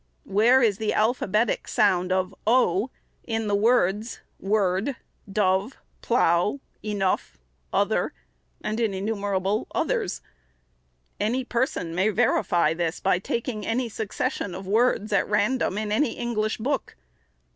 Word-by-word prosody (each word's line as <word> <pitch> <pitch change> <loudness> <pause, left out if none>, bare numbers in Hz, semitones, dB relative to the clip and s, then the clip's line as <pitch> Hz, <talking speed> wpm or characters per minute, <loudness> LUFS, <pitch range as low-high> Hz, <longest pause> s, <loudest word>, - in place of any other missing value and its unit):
Where 235 +6 +4
is 205 -4 +2
the 220 -1 0
alphabetic 215 -1 +1
sound 185 -3 +2
of 185 0 0
o 225 -2 +3 0.3
in 225 -2 -2
the 205 - -1
words 215 0 +2 0.2
word, 200 +4 +1 0.4
dove, 195 +3 +1 0.2
plough, 205 0 +2 0.2
enough, 195 - -1 0.3
other, - - +1 0.5
and 215 +2 -2
in 220 -4 0
innumerable 200 0 -1
others? - - -1 1.0
Any 240 +5 0
person 235 - -1
may 190 +5 +2
verify 180 -7 +2
this 165 0 -2
by 190 -2 +2
taking 230 +1 -3
any 235 +3 -1
succession 205 -3 -3
of 190 +1 -7
words, 215 0 +2
at 195 - +2
random, 210 0 +1
in 210 -1 -2
any 240 +3 +2
English 220 -3 -1
book. 265 +5 -2
210 Hz, 125 wpm, -25 LUFS, 190-230 Hz, 1.0 s, Where